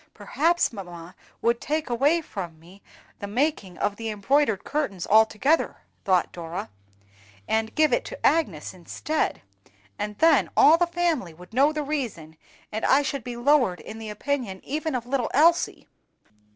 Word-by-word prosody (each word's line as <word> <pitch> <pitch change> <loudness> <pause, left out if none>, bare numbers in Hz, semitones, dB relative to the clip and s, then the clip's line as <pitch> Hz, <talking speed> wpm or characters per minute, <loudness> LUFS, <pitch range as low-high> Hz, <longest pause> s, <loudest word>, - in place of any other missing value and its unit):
"Perhaps 300 +10 +1
mamma 175 -4 -9 0.3
would 235 +1 +2
take 310 +1 -2
away 280 +7 +2
from 175 - -7
me 180 +5 -17 0.4
the 200 - -5
making 220 - -1
of 205 0 -1
the 225 -1 -4
embroidered 220 +1 +1
curtains 250 - -2
altogether," 220 +8 +3 0.2
thought 185 -3 +2
Dora, 165 - -6 0.8
"and 220 0 -1
give 310 0 +3
it - - +2
to - - -6
Agnes 200 - +1
instead; 190 - -3 0.6
and 210 0 -4
then 320 -3 +4
all 325 +3 +7
the 350 - +3
family 335 - -1
would 180 +6 -15
know 275 +5 +4
the 305 -1 -3
reason, 235 - -4 0.4
and 220 +1 -4
I 280 +2 +4
should 275 -3 -3
be 245 0 -6
lowered 245 -8 +3
in 220 - -9
the 220 -1 -7
opinion 215 -3 -3
even 310 +1 -2
of 240 -2 -3
little 255 0 -1
Elsie! 335 +4 +3
240 Hz, 155 wpm, -25 LUFS, 195-300 Hz, 0.8 s, all